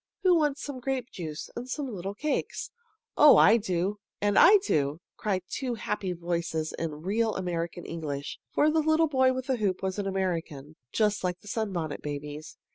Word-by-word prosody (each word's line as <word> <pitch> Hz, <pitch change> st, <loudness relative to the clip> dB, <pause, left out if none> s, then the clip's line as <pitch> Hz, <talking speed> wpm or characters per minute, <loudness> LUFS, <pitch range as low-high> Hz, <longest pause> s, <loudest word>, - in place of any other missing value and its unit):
Who 370 Hz, -1 st, +6 dB
wants 295 Hz, -3 st, +1 dB
some 280 Hz, -3 st, -5 dB
grape 260 Hz, -1 st, -3 dB
juice 155 Hz, -3 st, -6 dB
and 245 Hz, +2 st, -6 dB
some 290 Hz, +2 st, -2 dB
little 195 Hz, +1 st, -5 dB
cakes?" 300 Hz, +6 st, -2 dB, 0.4 s
"Oh, 300 Hz, -1 st, +8 dB
I 220 Hz, -, +7 dB
do!" 195 Hz, -1 st, -1 dB, 0.2 s
"And 205 Hz, 0 st, +1 dB
I 415 Hz, -, +8 dB
do!" 145 Hz, -, +1 dB, 0.2 s
cried 190 Hz, -4 st, -1 dB
two 255 Hz, +1 st, -3 dB
happy 210 Hz, -3 st, -3 dB
voices 170 Hz, -2 st, -2 dB
in 155 Hz, -2 st, -4 dB
real 220 Hz, +4 st, +1 dB
American 175 Hz, -2 st, -3 dB
English, 145 Hz, -4 st, -5 dB
for 305 Hz, +1 st, +3 dB
the 320 Hz, -, +2 dB
little 315 Hz, +1 st, +3 dB
boy 260 Hz, -3 st, +3 dB
with 260 Hz, 0 st, -3 dB
the 260 Hz, -2 st, 0 dB
hoop 195 Hz, -4 st, -1 dB
was 190 Hz, +1 st, -2 dB
an 200 Hz, -, -2 dB
American, 165 Hz, -6 st, -3 dB, 0.2 s
just 210 Hz, -2 st, +1 dB
like 180 Hz, -1 st, -2 dB
the -, -, -16 dB
Sunbonnet 190 Hz, -9 st, -3 dB
Babies. 150 Hz, +1 st, -6 dB
195 Hz, 180 wpm, -28 LUFS, 165-250 Hz, 0.4 s, Oh